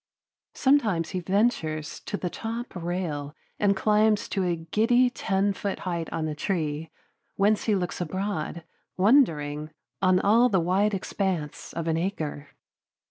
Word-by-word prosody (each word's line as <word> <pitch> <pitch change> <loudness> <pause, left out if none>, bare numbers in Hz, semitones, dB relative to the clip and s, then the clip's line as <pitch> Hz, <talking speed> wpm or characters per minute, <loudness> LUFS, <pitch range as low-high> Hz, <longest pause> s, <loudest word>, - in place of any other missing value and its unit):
Sometimes 215 - +2
he 185 - -2
ventures 170 -5 0
to 205 - -2
the 180 -3 -3
top 230 +2 -5
rail 165 -5 -3 0.2
and 200 -1 +3
climbs 210 +1 +3
to 195 - 0
a 175 -1 +1
giddy 225 +10 +2
ten 195 -3 0
foot 200 0 -3
height 170 -3 -3
on 160 -1 -2
a 155 - -2
tree, 155 -2 -2 0.5
whence 205 +2 +2
he 215 - +3
looks 180 -2 -2
abroad, 175 -1 -3 0.3
wondering, 155 - +3 0.3
on 185 -1 +4 0.3
the 195 -4 +3
wide 195 +5 +2
expanse 185 -5 -3
of 165 0 -4
an 160 0 +1
acre. 155 -5 -3
185 Hz, 135 wpm, -26 LUFS, 160-205 Hz, 0.5 s, on